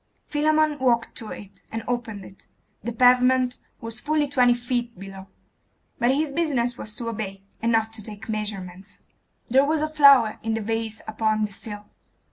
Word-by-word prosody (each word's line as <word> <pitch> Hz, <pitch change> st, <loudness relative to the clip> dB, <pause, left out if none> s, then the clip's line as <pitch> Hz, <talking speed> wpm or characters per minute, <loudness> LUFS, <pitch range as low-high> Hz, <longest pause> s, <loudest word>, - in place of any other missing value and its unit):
Philammon 305 Hz, 0 st, +2 dB
walked 240 Hz, -3 st, +1 dB
to 225 Hz, -, -8 dB
it, 200 Hz, -1 st, -10 dB
and 225 Hz, 0 st, -4 dB
opened 225 Hz, -5 st, -3 dB
it. 190 Hz, -, -16 dB, 0.4 s
The 235 Hz, -, -3 dB
pavement 250 Hz, +1 st, +4 dB, 0.2 s
was 230 Hz, 0 st, -5 dB
fully 300 Hz, +1 st, +1 dB
twenty 250 Hz, -3 st, +4 dB
feet 240 Hz, -2 st, -3 dB
below; 195 Hz, 0 st, -10 dB, 0.7 s
but 240 Hz, +1 st, +3 dB
his 300 Hz, 0 st, 0 dB
business 275 Hz, -6 st, 0 dB
was 215 Hz, -2 st, -4 dB
to 230 Hz, 0 st, -3 dB
obey, 195 Hz, -3 st, -5 dB, 0.2 s
and 230 Hz, +1 st, +1 dB
not 225 Hz, -1 st, +1 dB
take 215 Hz, -1 st, -8 dB
measurements. 200 Hz, -3 st, -5 dB, 0.5 s
There 265 Hz, +3 st, +5 dB
was 305 Hz, +1 st, +1 dB
a -, -, +1 dB
flower 280 Hz, -7 st, +6 dB
in 225 Hz, 0 st, -1 dB
the 225 Hz, -, -2 dB
vase 225 Hz, 0 st, -3 dB
upon 215 Hz, 0 st, 0 dB
the 210 Hz, -, -8 dB
sill. 205 Hz, 0 st, -8 dB
230 Hz, 165 wpm, -24 LUFS, 215-255 Hz, 0.7 s, flower